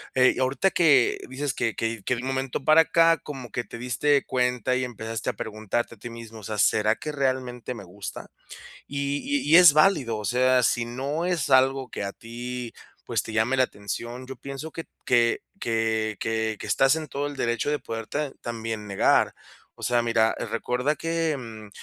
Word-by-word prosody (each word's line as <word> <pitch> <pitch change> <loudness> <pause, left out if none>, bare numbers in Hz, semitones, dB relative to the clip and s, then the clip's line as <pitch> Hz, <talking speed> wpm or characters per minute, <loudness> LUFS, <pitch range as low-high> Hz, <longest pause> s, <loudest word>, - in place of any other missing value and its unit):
eh, 130 -1 +5
ahorita 130 +8 +2
que 145 -8 +4
dices 135 +1 -2
que 115 - -1
que 115 -2 -3
que 125 - 0
de 120 - -5
un 130 - -5
momento 135 0 -2
para 155 +2 +7
acá, 165 0 +4
como 130 -7 -8
que 120 - -2
te 115 - -10
diste 140 +4 +1
cuenta 125 0 0
y 130 - 0
empezaste 115 -2 -4
a - - -18
preguntarte 110 +2 -3
a - - -27
ti 120 - -7
mismo, 115 -1 -10
o 105 - -14
sea: 105 +1 -4
"¿Será 110 +1 +3
que 150 - -5
realmente 130 -3 -2
me 120 - -9
gusta?", 100 +3 -8 0.6
y 140 0 -2
y 285 0 0
y - - +8
es 175 -4 +9
válido, 150 - +3
o 105 - -5
sea, 125 +3 +3
si 120 0 +1
no 135 +7 -3
es 175 -6 0
algo 130 0 +3
que - - -5
a 100 - -3
ti 120 +1 -7 0.3
pues, - - 0
te 110 - -8
llame 115 +4 +2
la 130 - +5
atención, 120 +3 -5
yo 135 - -7
pienso 140 +5 -7
que 165 - -7 0.2
que 120 -1 +3 0.2
que 110 -1 0
que 110 0 -1
que - - -7
estás 135 +2 +4
en 160 -1 -4
todo 140 +1 -3
el 145 - -7
derecho 120 +1 -1
de 150 - +1
poderte, 115 +4 -5
ah, 145 -3 -3
también 115 -2 -5
negar. 100 - +3 0.4
O - - -16
sea, 120 -1 +2
mira, 115 -1 +2
recuerda 125 +5 -1
que, 165 -1 -1
mm, 110 -4 -9
125 Hz, 200 wpm, -25 LUFS, 115-140 Hz, 0.6 s, es